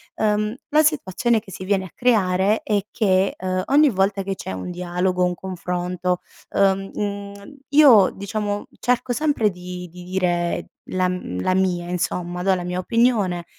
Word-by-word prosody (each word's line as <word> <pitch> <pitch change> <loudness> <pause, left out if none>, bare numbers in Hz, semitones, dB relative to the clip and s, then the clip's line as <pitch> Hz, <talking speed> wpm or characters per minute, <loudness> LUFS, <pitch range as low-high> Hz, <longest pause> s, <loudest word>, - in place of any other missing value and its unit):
Uhm, 210 0 +1 0.2
la 305 +1 +4
situazione 240 - +1
che 210 -2 -14
si 185 - -7
viene 190 -1 +1
a 180 - -11
creare 205 -4 +2
è 210 -2 +1
che, 190 -3 +2
uhm, 185 0 -2
ogni 295 +2 +5
volta 195 -2 +1
che 195 0 -3
c'è - - -6
un 95 - -5
dialogo, 180 +1 -1
un 180 0 +1
confronto, 180 0 -3 0.3
uhm, 195 0 +1
mhmm, 200 +4 -5
io 275 -9 +7
diciamo 205 0 -3
cerco 250 0 0
sempre 285 -6 +1
di 180 -1 -8
di 180 +2 -11
dire 175 -2 -1 0.2
la 185 0 +1
m 180 - -4
la 185 - +1
mia, 180 -2 0
insomma, 180 0 -2
do 190 0 +3
la 180 -1 -2
mia 180 0 -3
opinione, 205 -5 +1
190 Hz, 165 wpm, -22 LUFS, 180-210 Hz, 0.3 s, io